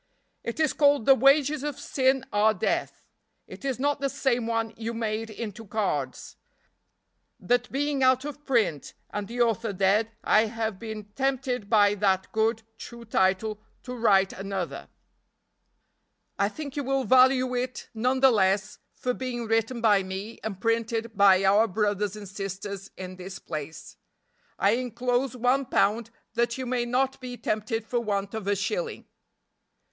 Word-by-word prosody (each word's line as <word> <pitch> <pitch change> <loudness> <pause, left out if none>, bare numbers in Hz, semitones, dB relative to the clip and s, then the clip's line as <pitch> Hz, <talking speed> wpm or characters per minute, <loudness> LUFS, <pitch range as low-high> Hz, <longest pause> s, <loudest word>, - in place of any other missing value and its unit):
"It 235 - -5
is 310 -3 +2
called 285 -5 +3
'The 270 - +8
Wages 275 +3 +4
of 295 -2 -4
Sin 265 -1 +1
are 215 +1 +4
Death.' 180 - -2 0.4
It - - -12
is 270 -2 -1
not 285 +2 0
the 275 0 0
same 245 -4 0
one 225 -1 -1
you 230 +1 -5
made 225 0 -2
into 220 0 -6
cards; 190 - -3 1.0
that 245 +5 0
being 285 0 -1
out 260 +1 +4
of 295 0 -7
print 225 - 0 0.2
and 205 -1 -4
the 240 +3 -3
author 230 -1 +1
dead 200 +4 +2
I 215 +1 +4
have 220 -3 -3
been 220 -2 -6
tempted 260 -5 -1
by 205 -2 +5
that 190 -2 0
good, 225 +1 +1 0.2
true 235 -1 -9
title 205 +1 +1 0.2
to 250 - -6
write 195 -5 +3
another. 195 -2 -5 1.5
I 200 - +3
think 285 +3 -7
you 290 - -2
will 270 0 0
value 255 0 +4
it 250 0 -3
none 250 +4 0
the 265 -1 +7
less 195 -1 +1 0.2
for 250 - -2
being 245 -2 -4
written 225 +2 0
by 210 -4 +4
me 190 +4 -6
and 200 -4 -4
printed 230 0 -1
by 195 -1 +6
our 205 +4 +5
brothers 205 0 -1
and 210 -1 -8
sisters 195 0 -6
in 185 0 -7
this 185 +1 -8
place. 155 0 -7 0.6
I 200 - +3
inclose 245 +1 -1
one 250 +2 +2
pound 225 +2 +1 0.2
that 235 +1 0
you 260 - -4
may 245 -1 -1
not 260 +2 0
be 250 -1 -6
tempted 220 +1 -2
for 240 +1 -1
want 200 -3 -2
of 220 -3 -5
a 205 - +2
shilling." 450 - -3
225 Hz, 160 wpm, -27 LUFS, 205-255 Hz, 1.5 s, The